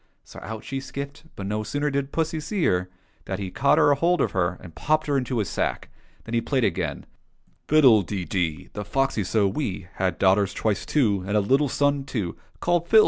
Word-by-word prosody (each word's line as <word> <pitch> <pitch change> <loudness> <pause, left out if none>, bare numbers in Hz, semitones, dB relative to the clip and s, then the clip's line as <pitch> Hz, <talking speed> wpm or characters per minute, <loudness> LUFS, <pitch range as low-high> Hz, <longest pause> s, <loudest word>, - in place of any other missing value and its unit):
So - - -12
out 110 +1 -6
she 135 - -4
skipped, 140 +3 -7
but 100 - -6
no 105 +2 -1
sooner 145 +6 -1
did 140 0 -2
pussy 160 -1 -1
see 175 +4 -2
her 90 0 +1 0.4
than 95 - -3
he 95 -2 -5
caught 140 +7 +3
hold 165 +5 +4
of - - +1
her 90 -1 0
and 85 - -12
popped 155 - +1
her 145 - 0
into 130 -2 -1
his 105 -4 0
sack. - - -2 0.3
Then 115 - -8
he 115 - +2
played 130 +1 0
again: 95 - -1 0.6
^''Fiddle 130 -9 +6
de 95 -1 -4
dee! 80 -3 -2
The 105 - -4
foxy 135 -1 0
so 100 +2 +2
wee 95 -5 -3
Had 95 -1 0
daughters 95 +1 +3
twice 105 -3 -1
two. 105 -10 +2
And 105 +1 +1
a - - +5
little 135 +8 +2
son 145 0 +1
too. 105 -10 -3 0.2
Called 175 -1 +1
Phil. 220 - +7
115 Hz, 205 wpm, -25 LUFS, 95-145 Hz, 0.6 s, Phil